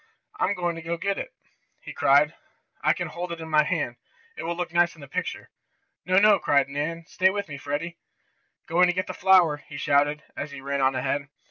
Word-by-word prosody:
"I'm 205 - +1
going 175 -1 -1
to 170 +1 -2
get 200 +3 -1
it!" - - -5 0.5
he - - -9
cried. 145 +3 +4 0.5
"I - - +5
can - - -2
hold 175 0 -5
it 170 - -5
in 160 - -7
my 150 0 +5
hand. 150 -7 -2 0.4
It - - -6
will 170 +1 -3
look 175 -1 -4
nice 175 +1 +3
in 160 - -15
the 140 - -10
picture." - - -4 0.6
"No, 185 0 +3
no!" 205 0 +6
cried 140 -3 +2
Nan. 155 +4 -3
"Stay 185 +1 +2
with 200 +1 -3
me, 145 -2 -7
Freddie." 150 +5 -4 0.7
"Going 175 +2 +4
to 180 - +1
get 185 +2 -1
the - - -6
flower!" 180 -6 +4
he 145 0 -11
shouted, 145 +2 +2
as 145 - -5
he 140 -1 -9
ran 140 +1 -2
on 130 0 +3
ahead. 140 +2 -1
165 Hz, 215 wpm, -25 LUFS, 145-180 Hz, 0.7 s, no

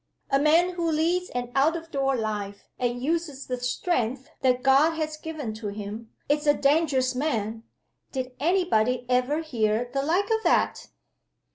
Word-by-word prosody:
A 275 - +4
man 325 +5 +4
who 340 -2 -1
leads 340 +4 +1
an 245 0 -4
out 290 +5 +3
of 330 0 -7
door 270 -2 +1
life, 210 -3 -4
and 245 0 -1
uses 310 -2 -2
the 250 -1 -3
strength 255 +1 -1
that 250 -1 +2
God 280 +4 +5
has 310 -1 -2
given 305 -7 -5
to 215 0 -6
him, 210 +2 -6 0.2
is 295 +1 0
a 290 - +6
dangerous 275 -3 +2
man. 225 -5 -2 0.5
Did 260 -1 -3
any 355 +6 +2
body 245 -4 +1
ever 255 +5 +1
hear 235 -4 0
the 275 - +1
like 360 +9 +1
of 445 0 +2
that?" - - +1
270 Hz, 165 wpm, -26 LUFS, 245-320 Hz, 0.5 s, a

